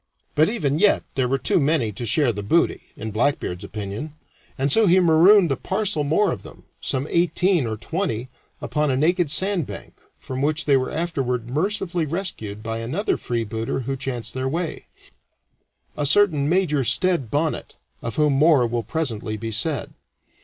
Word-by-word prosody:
But 155 +2 +3
even 155 - -1
yet 205 +1 +4
there 130 -2 +1
were 135 +2 +1
too 135 - +2
many 140 -6 +1
to 115 +4 -5
share 125 +3 +3
the 105 - -5
booty, 160 +12 +1
in 110 - -5
Blackbeard's 110 -5 -1
opinion, 105 +9 -6 0.4
and 135 +1 +1
so 220 +4 +5
he 185 +2 +5
marooned 175 +1 +5
a - - +2
parcel 190 -2 -1
more 165 +6 +2
of - - -5
them - - -14 0.2
some 130 +1 -2
eighteen 175 -3 +1
or 110 -1 -3
twenty 130 - -3 0.3
upon 150 -1 0
a 130 - +1
naked 170 +2 +2
sand 180 0 +2
bank, - - -9 0.2
from 130 0 -6
which 155 +2 0
they 140 - +4
were 130 -1 0
afterward 125 -8 -2
mercifully 175 +1 -1
rescued 140 - -4
by 115 0 -3
another 135 - -1
freebooter 115 +1 -3
who 135 +2 -3
chanced 130 -3 -4
that 130 0 -2
way 165 +3 -4 1.1
a 145 -1 0
certain 155 -5 +3
Major 165 -6 +2
Stede 170 - +1
Bonnet, 150 +5 -2 0.3
of 115 - -5
whom 150 -2 +2
more 145 -2 +4
will 120 0 -1
presently 115 -7 -3
be 115 +1 -5
said. 140 +5 -1
145 Hz, 170 wpm, -22 LUFS, 120-170 Hz, 1.1 s, so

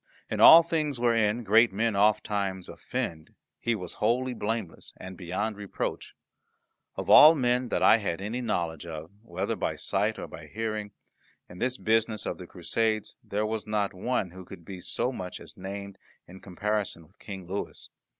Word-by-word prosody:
In - - -2
all 165 +1 +10
things 155 -5 -1
wherein 115 -1 +2
great 110 +2 +5
men 110 +2 0
ofttimes 100 -2 +1
offend 80 -2 -5 0.2
he 120 -1 0
was 90 -5 -7
wholly 125 +4 +1
blameless 110 -6 -4
and 95 0 -9
beyond 95 +5 -3
reproach. 100 -1 -5 0.8
Of - - -5
all 155 +2 +9
men 125 -2 +1
that - - 0
I - - +7
had 95 -6 -3
any 110 +6 -3
knowledge 85 -8 -2
of, 80 +1 -7
whether 115 - -3
by - - -2
sight - - 0
or - - -5
by - - -11
hearing, 110 -1 -3 0.6
in 90 - -12
this 130 +1 0
business 110 -1 +1
of - - -4
the - - -9
Crusades 110 -2 -1
there 105 +2 -2
was 110 0 -3
not 105 -2 0
one 95 -1 -2
who 95 +1 -10
could 85 -2 -12
be 95 0 -8
so 120 +7 -1
much 90 -8 -6
as - - -12
named 100 0 -7 0.3
in 95 +2 -12
comparison 100 -2 -3
with 90 +7 -28
King 95 -3 -8
Louis. 95 +3 -5
105 Hz, 170 wpm, -28 LUFS, 95-115 Hz, 0.8 s, all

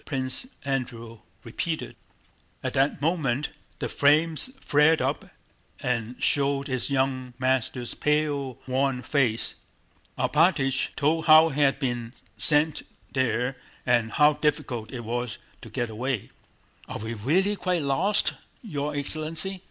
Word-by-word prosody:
Prince 130 - -2 0.2
Andrew 120 -4 -4 0.2
repeated. 160 +8 -4 0.7
At - - -2
that 135 +1 +1
moment 150 -5 0 0.3
the - - -3
flames 155 - +2
flared 150 - +4
up - - -1 0.5
and 120 -1 -2
showed 140 0 +1
his 130 -1 0
young 130 -2 -1
master's 130 -1 0
pale 145 -4 0
worn 130 0 0
face. 120 -4 0 0.6
Alpátych 150 -5 +2
told 155 +2 +1
how 155 +1 +8
he 145 0 -2
had 140 -1 +3
been 120 -4 -3 0.2
sent 150 0 +4 0.3
there 125 0 0 0.3
and 120 -2 +2
how 150 0 +5
difficult 145 -7 -2
it 120 -3 -6
was 120 +1 -3 0.2
to - - -10
get 120 -2 -3
away. 120 0 -3 0.6
"Are - - -4
we 110 +2 -5
really 170 - +1
quite 180 -5 -1
lost, 180 +10 +1 0.3
your 150 -7 -3
excellency?" 155 +6 +1
140 Hz, 125 wpm, -26 LUFS, 125-150 Hz, 0.7 s, how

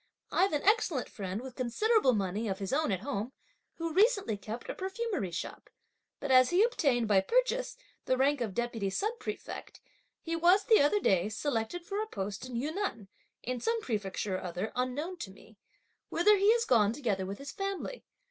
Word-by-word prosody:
I've 390 - +3
an 295 -1 -1
excellent 380 - +2
friend 195 +1 -5
with 260 -1 -8
considerable 260 - +2
money 205 +1 -1
of 190 -2 -2
his 195 +3 -4
own 305 -4 +1
at 190 -2 -1
home, 255 -1 -3 0.4
who 330 -1 -3
recently 400 - +3
kept 220 +4 -7
a - - -3
perfumery 385 - -3
shop; 170 - -6 0.5
but 285 - -3
as 255 -1 +7
he 360 +4 +4
obtained, 275 - +2
by 200 -2 +5
purchase, - - 0 0.3
the 255 - +2
rank 275 +1 +2
of 210 -5 -2
deputy 235 -4 -1
sub 425 - -2
prefect, 425 0 -7 0.4
he 330 0 -3
was, 355 +4 +5
the 440 -4 +5
other 295 +9 +3
day, 190 - +2
selected 255 +7 -2
for 405 +3 -2
a 435 - -3
post 200 - -5
in 250 - -7
Yunnan, 280 - -3 0.3
in 250 0 -3
some 460 - +1
prefecture 205 - -2
or - - -7
other 180 +4 -4
unknown 285 +9 -2
to 220 - -6
me; 200 +2 -17 0.5
whither 415 +5 +5
he 400 +2 +5
has 470 -1 +1
gone 215 -3 +4
together 210 -8 -1
with 200 +1 -5
his 275 0 -7
family. 395 +5 -4
260 Hz, 185 wpm, -31 LUFS, -, 0.5 s, as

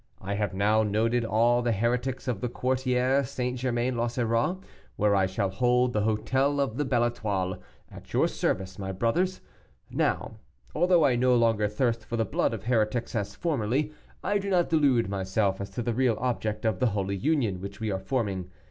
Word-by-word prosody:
I 100 +2 -4
have 100 -2 -2
now 105 +3 +3
noted 110 +3 +1
all 115 +2 +3
the 120 -1 +1
heretics 125 +5 -1
of 115 -6 -2
the 125 - -1
Quartier 130 +2 +1
St. 125 0 -3
Germain 125 0 0
l'Auxerrois, 120 +5 0 0.4
where 105 -1 +2
I 95 -1 +3
shall 95 +1 -1
hold 125 +2 +2
the 105 - +1
hotel 130 +7 +1
of 135 -4 -1
the 145 - 0
Belle 120 -3 +2
Etoile, 100 -6 -2 0.3
at - - -13
your - - +3
service, 95 0 -2
my 95 -1 -3
brothers. 160 - 0 0.5
Now, - - -1 0.4
although 175 -1 +4
I 130 -3 +3
no 125 +1 +3
longer 115 -3 +3
thirst 115 +2 -1
for 120 - -4
the 115 - +1
blood - - 0
of - - -9
heretics 115 0 0
as 105 -4 -3
formerly, 145 -2 -1 0.3
I 205 - +1
do 200 0 -4
not 180 -3 +2
delude 140 -8 +3
myself 95 0 -1
as 100 - -5
to 120 - -4
the 120 - -1
real 120 -2 +2
object 110 -3 -2
of 110 -5 +1
the 125 - +3
holy 100 0 -1
Union 115 - 0
which 100 +1 -7
we 110 -2 -2
are 95 - -2
forming. 95 -5 -2
115 Hz, 190 wpm, -27 LUFS, 105-130 Hz, 0.5 s, although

